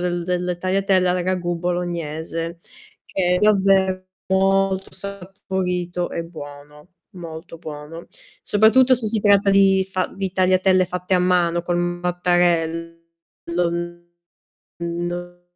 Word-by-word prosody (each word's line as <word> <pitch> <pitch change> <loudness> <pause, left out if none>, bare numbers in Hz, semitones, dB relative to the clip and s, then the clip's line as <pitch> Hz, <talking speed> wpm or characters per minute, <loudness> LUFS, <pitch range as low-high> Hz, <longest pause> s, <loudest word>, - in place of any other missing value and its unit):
del 175 -1 -1
delle 180 0 -1
tagliatelle 185 0 +1
al 180 0 0
ragù 175 -1 -1
bolognese, 165 -1 -3 0.5
che 180 -1 0
è - - +1
davvero 190 -2 +3 0.2
molto 195 0 +1
saporito 180 -2 -4
e 170 - -3
buono, 150 -1 -11 0.3
molto 165 -1 -9
buono. 155 +1 -9 0.4
Soprattutto 235 +5 +5
se 235 -3 -1
si 215 -1 +1
tratta 200 -1 +4
di 195 -1 +4
fa 185 -1 -1
di 195 -1 -3
tagliatelle 185 0 +3
fatte 180 +1 -5
a 180 - +4
mano 175 -1 +2
col 175 0 -1
mattarello, 175 -1 0 1.8
non 175 +1 -4
180 Hz, 110 wpm, -21 LUFS, 170-190 Hz, 1.8 s, Soprattutto